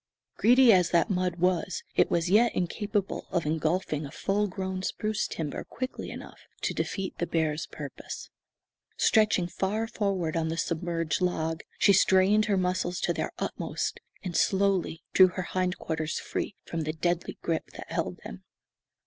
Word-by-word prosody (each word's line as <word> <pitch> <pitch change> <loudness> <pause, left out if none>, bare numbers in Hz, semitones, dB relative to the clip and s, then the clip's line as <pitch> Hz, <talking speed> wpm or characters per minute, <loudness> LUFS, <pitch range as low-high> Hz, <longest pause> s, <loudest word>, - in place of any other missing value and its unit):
Greedy 245 0 +6
as 180 -2 +4
that 175 +5 +2
mud 180 -2 0
was, 180 +1 0
it - - +4
was 170 0 +1
yet 220 +6 +4
incapable 200 +2 -2
of 175 -4 0
engulfing 155 0 0
a 140 - -6
full 205 +5 0
grown 190 -1 -4
spruce 210 +2 -1
timber 155 -3 -4
quickly 255 0 -5
enough - - -9 0.2
to - - 0
defeat 195 -2 -3
the 175 - 0
bear's 160 -1 0
purpose. - - -8 0.7
Stretching 215 -5 +4
far 195 +5 -1
forward 195 -7 -1
on 165 -1 +1
the 165 +1 -2
submerged 165 -1 -1
log, 160 -3 0 0.2
she 200 - +5
strained 195 +3 +5
her 205 -3 +1
muscles 180 -1 0
to - - +1
their - - -2
utmost, - - -3 0.2
and 180 -3 -4
slowly 190 -4 +1
drew 185 - +8
her 185 +1 -4
hind 185 +1 -1
quarters 160 -1 -2
free - - -3
from 165 - -3
the 155 0 -2
deadly 175 +2 -1
grip 165 -2 -1
that - - -10
held - - -2
them. - - -9
180 Hz, 160 wpm, -28 LUFS, 165-195 Hz, 0.7 s, drew